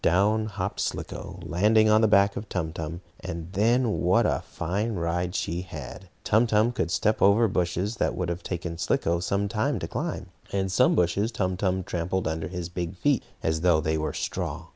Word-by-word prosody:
Down 105 +5 +3
hopped 100 -2 -4
Slicko, - - -4
landing 110 +5 +3
on 110 0 +5
the 110 - +5
back 100 -1 +4
of 105 - -6
Tum 80 -4 -2
Tum, 85 +1 -5 0.2
and 85 +2 -6
then 115 +3 +2
what 95 +6 +3
a - - +1
fine 100 +7 -2
ride 85 +1 -1
she 85 +2 -1
had! 85 +1 -9
Tum 110 +3 +3
Tum 110 +2 +3
could 95 -8 -1
step 105 +4 +1
over 105 +4 +5
bushes 95 +3 -1
that - - 0
would 90 - -2
have 85 0 -3
taken 85 -1 -4
Slicko 85 0 +1
some 100 +3 0
time 110 +1 0
to - - -4
climb, - - -4 0.2
and 95 -1 -1
some 95 - +4
bushes 90 +6 +1
Tum 95 -4 -1
Tum 95 0 0
trampled 90 +2 -2
under 80 0 -2
his 90 -1 -5
big 90 0 -4
feet 140 +2 +2 0.2
as 80 0 0
though 85 -3 +4
they 80 0 0
were 80 0 -1
straw. - - -4
95 Hz, 195 wpm, -26 LUFS, 85-105 Hz, 0.2 s, on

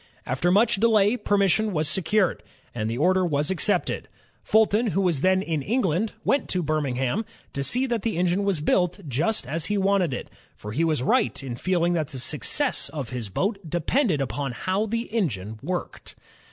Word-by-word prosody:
After 130 +8 0
much 220 +3 +4
delay, 215 0 +4
permission 205 -1 +1
was 155 -2 0
secured, 190 +3 +1 0.3
and 110 -2 -2
the 115 - -3
order 185 +6 +3
was 150 -1 +1
accepted. 190 +3 0 0.3
Fulton, 220 +1 +3
who 195 -1 0
was 170 -7 +1
then 190 0 +3
in 160 -5 -2
England, 205 - 0
went 280 - +1
to 180 -1 -1
Birmingham 145 - -1 0.3
to 140 - -2
see 250 - +2
that 235 -4 -1
the 220 -6 -2
engine 180 +3 +1
was 195 -6 0
built 180 +2 0
just 150 - -1
as 155 +5 -3
he 210 - 0
wanted 195 -4 +2
it; 125 - -5 0.2
for 105 - -8
he 150 +10 0
was 155 -6 +1
right 130 0 +1
in 125 -3 -5
feeling 175 +4 +1
that 160 -4 0
the 135 - -8
success 160 - 0
of 140 -6 -5
his 120 -5 -5
boat 195 - -1
de 175 - -1
pended 180 - +1
upon 135 0 -3
how 190 - -1
the 230 +2 -1
engine 110 - -2
worked. 180 +4 -5
180 Hz, 185 wpm, -25 LUFS, 145-205 Hz, 0.3 s, much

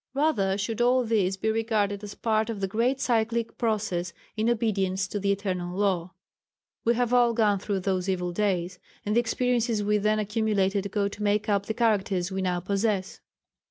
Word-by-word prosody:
Rather 210 -10 +1
should 220 +3 -2
all 250 +1 +4
this 200 -5 +1
be 220 +3 0
regarded 215 -2 0
as 205 -1 -7
part 220 -1 0
of 220 -3 -4
the 195 - -1
great 235 +7 0
cyclic 230 -1 0
process 205 -7 -1 0.2
in 220 +2 +1
obedience 195 -5 0
to 205 - -3
the 200 0 +1
eternal 185 -3 -2
law. 185 -3 0 0.7
We 235 +1 +3
have 245 0 0
all 240 -2 +4
gone 210 -3 +3
through 200 -1 -2
those 185 0 -1
evil 180 -2 -1
days, 185 -2 -1 0.3
and 210 +1 0
the - - +6
experiences 240 -2 0
we 210 +1 +2
then 215 +1 +2
accumulated 205 -2 0
go 200 +1 0
to 200 +1 -8
make 210 0 +1
up 200 -1 +1
the 220 - -2
characters 200 -5 +1
we 190 0 -2
now 180 -1 -1
possess. 200 0 -1
205 Hz, 185 wpm, -27 LUFS, 190-225 Hz, 0.7 s, the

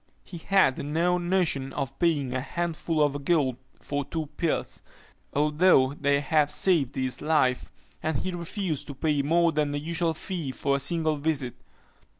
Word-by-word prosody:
He 175 - -9
had 190 -7 +3
no 170 +5 +1
notion 175 -7 0
of 135 0 -4
paying 145 -7 +1
a 130 - -1
handful 165 +1 -1
of 145 -1 -1
gold 140 -6 +1 0.2
for 145 0 -3
two 155 +3 -4
pills, 170 -3 -2 0.5
although 150 -2 +3
they 140 0 +1
had 150 0 +2
saved 150 -4 +2
his 130 -1 -2
life, 145 -5 +1 0.3
and 155 -3 -1
he 185 - -3
refused 175 -2 -4
to 140 - -7
pay 150 +1 +1
more 170 +4 +3
than 150 -1 0
the 145 0 -2
usual 165 +1 0
fee 160 -5 -4
for 140 +1 0
a - - -4
single 155 +2 0
visit. 140 -4 -1
150 Hz, 160 wpm, -27 LUFS, 140-170 Hz, 0.5 s, had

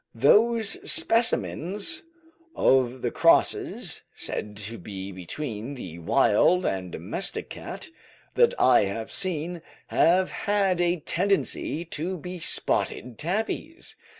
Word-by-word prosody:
Those 220 - +3
specimens 215 - +1 0.5
of 130 -1 +2
the - - 0
crosses, - - +2
said 105 -1 -5
to 105 +3 -4
be 95 -1 -7
between 110 - -5
the 85 -9 -8
wild 115 - +3
and 95 -2 -2
domestic - - -1
cat, - - -7 0.5
that - - +4
I - - +5
have 110 +3 -5
seen, 175 -2 -1 0.3
have 185 +3 +3
had 195 -3 0
a 175 -1 +1
tendency 180 -2 0
to 170 +3 -4
be 180 +2 -7
spotted 125 -6 -1
tabbies. 220 - -3
165 Hz, 110 wpm, -26 LUFS, 115-190 Hz, 0.5 s, I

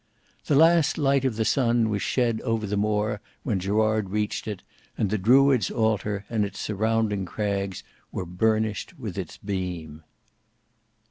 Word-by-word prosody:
The 145 - +3
last 165 +1 +5
light 140 -2 +2
of 125 -4 0
the 110 0 0
sun 120 -3 +2
was 100 -2 -1
shed 120 -1 0
over 115 -1 -1
the 105 0 -2
Moor 105 0 0 0.2
when 110 -8 0
Gerard 110 +1 +1
reached 105 +2 -2
it, 105 -4 -5 0.3
and 100 - 0
the 110 - +1
Druids' 130 +1 +4
altar 105 -2 0
and 110 -2 0
its 100 - -5
surrounding 110 -1 0
crags 100 -1 -3 0.3
were 90 - -4
burnished 110 +4 -1
with - - -6
its - - -6
beam. 90 -6 -5
105 Hz, 150 wpm, -25 LUFS, 100-115 Hz, 0.3 s, last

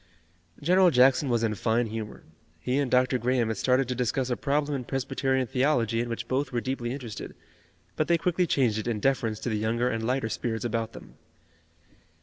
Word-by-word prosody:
General 180 +3 +5
Jackson 130 0 +4
was 120 -2 +1
in 110 -2 +1
fine 110 +4 +1
humor. 110 -1 -6 0.4
He 125 - 0
and 140 -3 0
Dr. 125 0 +2
Graham 120 -1 +1
had 110 - -2
started 130 +3 +2
to 125 - -1
discuss 125 +1 -1
a - - +2
problem 145 +3 0
in 130 - -3
Presbyterian 130 0 -1
theology 120 -3 +1
in 120 - -4
which 115 0 -4
both 130 +2 -1
were 120 - 0
deeply 120 -1 -3
interested, 125 -5 -7 0.6
but 155 - 0
they 170 - +4
quickly 175 +2 0
changed 120 -8 +1
it 110 - -5
in 115 -3 -1
deference 115 -3 0
to - - -2
the 110 -2 -1
younger 115 +3 0
and 115 0 -3
lighter 125 0 0
spirits 110 -1 -3
about 115 -1 -2
them. - - -13
125 Hz, 195 wpm, -27 LUFS, 115-135 Hz, 0.6 s, General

